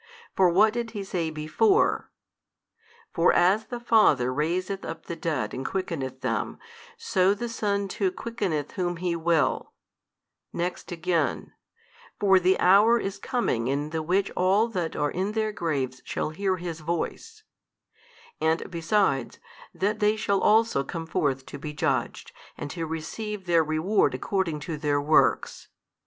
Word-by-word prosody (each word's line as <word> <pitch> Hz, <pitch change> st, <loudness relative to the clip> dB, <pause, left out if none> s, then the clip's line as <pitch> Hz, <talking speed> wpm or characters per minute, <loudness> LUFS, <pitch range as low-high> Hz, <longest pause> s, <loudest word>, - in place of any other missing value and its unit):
For 185 Hz, -2 st, +5 dB
what 210 Hz, +5 st, +4 dB
did 235 Hz, -1 st, -3 dB
He 200 Hz, -, -3 dB
say 175 Hz, -4 st, -2 dB
before? 160 Hz, -, +1 dB, 1.0 s
For -, -, +4 dB
as 200 Hz, +5 st, +3 dB
the 245 Hz, -, -5 dB
Father 185 Hz, -, +3 dB
raiseth 185 Hz, +7 st, -1 dB
up 165 Hz, 0 st, -7 dB
the 170 Hz, -, -5 dB
dead 160 Hz, -5 st, -2 dB
|275 -, -, -12 dB
and 135 Hz, -, -5 dB
quickeneth 140 Hz, -9 st, -4 dB
them, -, -, -2 dB, 0.4 s
so 200 Hz, -, +2 dB
the 240 Hz, +4 st, -4 dB
Son 200 Hz, -3 st, -1 dB
too 190 Hz, 0 st, -1 dB
quickeneth 185 Hz, -9 st, -3 dB
whom 175 Hz, -2 st, -2 dB
He 175 Hz, 0 st, -1 dB
will, 165 Hz, -1 st, 0 dB, 0.8 s
next 175 Hz, +1 st, -4 dB
again, 170 Hz, -1 st, -1 dB, 0.7 s
For 195 Hz, -2 st, +5 dB
the 185 Hz, +1 st, +2 dB
hour 205 Hz, +6 st, +6 dB
is 195 Hz, -4 st, -4 dB
coming 125 Hz, -, -1 dB
in 145 Hz, +3 st, -1 dB
the 160 Hz, -1 st, -2 dB
which 185 Hz, +5 st, 0 dB
all 195 Hz, +5 st, +2 dB
that 180 Hz, -7 st, -3 dB
are 145 Hz, 0 st, 0 dB
in 190 Hz, +4 st, -2 dB
their 215 Hz, -1 st, 0 dB
graves 140 Hz, -9 st, -2 dB
shall -, -, -3 dB
hear 190 Hz, +3 st, -1 dB
His 170 Hz, -2 st, -5 dB
Voice; 175 Hz, -, -4 dB, 1.0 s
and 160 Hz, +3 st, 0 dB
besides, 165 Hz, -, 0 dB, 0.3 s
that 210 Hz, +2 st, -1 dB
they 210 Hz, 0 st, +3 dB
shall 200 Hz, -3 st, 0 dB
also 220 Hz, -9 st, +3 dB
come 165 Hz, +4 st, -5 dB
forth 135 Hz, -4 st, -1 dB
to 145 Hz, -, -9 dB
be 150 Hz, +1 st, -6 dB
judged -, -, -2 dB, 0.3 s
and 145 Hz, -, -6 dB
to 165 Hz, -2 st, -4 dB
receive 190 Hz, +6 st, -5 dB
their 170 Hz, -2 st, +4 dB
reward 155 Hz, +7 st, +1 dB
according 175 Hz, -7 st, -2 dB
to 160 Hz, 0 st, -4 dB
their 145 Hz, -1 st, 0 dB
works. 150 Hz, +2 st, +2 dB
180 Hz, 150 wpm, -26 LUFS, 155-205 Hz, 1.0 s, hour